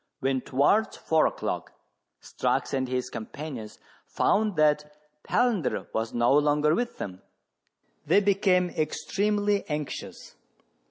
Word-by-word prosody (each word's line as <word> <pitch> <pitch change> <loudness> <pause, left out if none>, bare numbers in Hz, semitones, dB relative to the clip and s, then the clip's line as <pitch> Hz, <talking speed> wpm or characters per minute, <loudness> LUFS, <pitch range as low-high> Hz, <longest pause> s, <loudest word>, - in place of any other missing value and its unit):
When, 135 -2 0
towards 145 - +2
four 160 -1 +2
o'clock, - - -4 0.5
Strux - - -1
and 130 -1 0
his 125 0 -2
companions 120 -1 -7 0.3
found 210 -2 +1
that 150 -1 +2 0.3
Palander 225 - 0
was 110 0 -1
no 120 +2 +2
longer 150 +1 +3
with 240 +5 -2
them, 95 -1 -6 0.9
they - - +5
became 190 -3 +2
extremely 205 +6 0
anxious. 150 -1 -5
150 Hz, 110 wpm, -27 LUFS, 130-200 Hz, 0.9 s, they